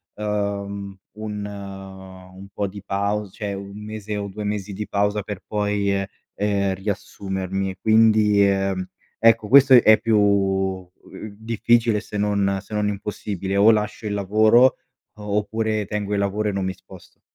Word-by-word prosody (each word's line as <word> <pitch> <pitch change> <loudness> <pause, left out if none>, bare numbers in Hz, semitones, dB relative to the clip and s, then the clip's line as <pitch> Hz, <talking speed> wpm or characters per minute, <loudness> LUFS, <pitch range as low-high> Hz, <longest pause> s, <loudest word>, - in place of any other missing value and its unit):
uhm, 100 -1 -3 0.2
un 105 -1 -5
un 95 -1 -10
po' 100 - -2
di 100 +1 -9
pau 100 +1 -2
cioè 100 +1 -5
1 100 +2 -8
mese 110 -1 -5
o 100 0 -3
2 105 +2 -7
mesi 105 -1 -3
di 105 +2 -5
pausa 105 +1 0
per 100 -1 -7
poi, 105 -1 -1
ehm, 100 0 -1 0.3
ehm, 100 -1 0
riassumermi. 95 -1 -4
E, 95 - -8
quindi, 110 -2 +4
ehm, 95 -1 0 0.4
ecco, 115 -1 +4
questo 135 +2 +7
è 110 -3 +7
più 110 -1 +2
u 95 -2 +1 0.5
difficile, 115 +1 +1
ehm, - - -3
se 105 - -7
non 100 -1 +1
se 105 - -13
non 105 -1 0
impossibile. 100 -1 -4
O 100 +3 +6
lascio 105 0 -2
il 105 - -2
lavoro 110 +5 +4 0.4
oppure 105 +1 -1
tengo 105 0 -4
il 100 - +1
lavoro 100 +2 -1
e - - -1
non 100 -1 -2
mi 95 - -2
sposto. - - -17
100 Hz, 160 wpm, -22 LUFS, 100-105 Hz, 0.5 s, questo